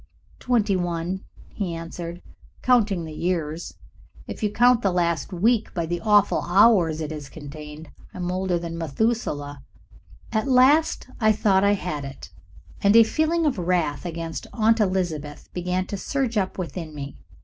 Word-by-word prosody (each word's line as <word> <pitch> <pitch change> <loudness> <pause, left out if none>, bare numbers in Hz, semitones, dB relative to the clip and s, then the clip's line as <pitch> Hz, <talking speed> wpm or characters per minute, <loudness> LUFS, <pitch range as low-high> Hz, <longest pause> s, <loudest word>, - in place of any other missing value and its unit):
"Twenty 220 -5 +1
one," 175 +1 -2 0.3
he 185 -5 -3
answered, 170 +1 -7 0.4
"counting 210 -9 +3
the 155 - -8
years. 165 -1 -3 0.5
If - - -8
you 210 -1 0
count 245 +2 +4
the 195 - +2
last 170 0 0
week 220 +5 +1
by 170 -2 -1
the 175 +1 -3
awful 205 0 +3
hours 175 -4 +4
it 155 0 -4
has 150 -3 -7
contained 150 +1 -10 0.2
I - - -11
am 180 0 -2
older 185 -1 0
than 170 -1 -5
Methuselah." 150 - -2 0.7
At 220 +2 0
last 275 +5 +4
I 215 -1 +4
thought 200 -2 +2
I 200 0 +4
had 180 -7 -3
it, 135 -1 -9 0.5
and 200 +2 +4
a 230 - +9
feeling 315 +7 +1
of 275 -9 0
wrath 170 -5 0
against 165 -2 -5
Aunt 225 0 +3
Elizabeth 175 -7 -2
began 180 +1 -1
to 200 - -5
surge 260 +2 -2
up 190 -3 -1
within 165 -3 -5
me. 140 -1 -7
180 Hz, 160 wpm, -24 LUFS, 165-215 Hz, 0.7 s, a